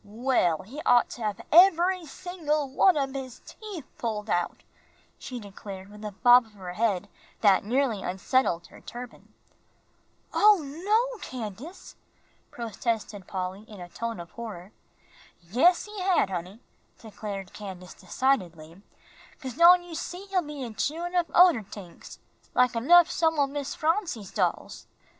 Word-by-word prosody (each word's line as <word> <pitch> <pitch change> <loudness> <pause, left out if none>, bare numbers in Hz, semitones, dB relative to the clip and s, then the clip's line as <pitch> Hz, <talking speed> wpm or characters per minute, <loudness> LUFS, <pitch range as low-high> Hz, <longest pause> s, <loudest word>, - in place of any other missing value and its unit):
"Well, 210 -6 0
he 265 +10 -8
ought 245 -1 +4
to 240 - -9
hab 210 -2 -3
eb'ry 355 0 +5
single 305 -3 -2
one 310 +6 +3
ob 270 -2 -1
his 260 -3 -7
teef 405 -10 -9
pulled 215 -2 -3
out," 175 0 -1 0.6
she 250 -2 -7
declared, 200 -1 -10
with 210 +1 -12
a 210 - -4
bob 245 +3 +5
of 220 - -23
her 185 -3 -8
head 205 -2 0 0.3
that 200 -3 +5
nearly 235 -1 0
unsettled 185 -1 0
her - - -16
turban. 245 0 -10 1.0
"Oh, 420 0 +6
no, 425 - 0
Candace," 245 - -8 0.5
protested 220 -3 -4
Polly, 185 +1 -4
in 210 -3 -11
a 175 -1 -9
tone 230 +2 -5
of 170 0 -9
horror. 210 -5 -8 0.7
"Yes, 250 - +3
he 420 -2 -8
had, 365 - +2
honey," 185 +5 -6 0.4
declared 205 -4 -7
Candace, 190 -3 -9
decidedly, 180 -6 -2 0.6
"'cause 260 -3 -6
don' 350 +5 +7
you 350 -1 -11
see, 355 +4 -6
he'll 370 -2 +2
be 295 -4 -7
a 235 -3 -6
chewin' 335 +9 -3
up 350 -2 +1
oder 350 -9 +6
tings, 195 -3 -11 0.4
like 250 -1 +3
enough 335 +9 +6
some 320 -1 +1
o' 285 - +4
Miss 280 0 -5
Phronsie's 315 - -1
dolls." - - -2
240 Hz, 145 wpm, -27 LUFS, 200-320 Hz, 1.0 s, don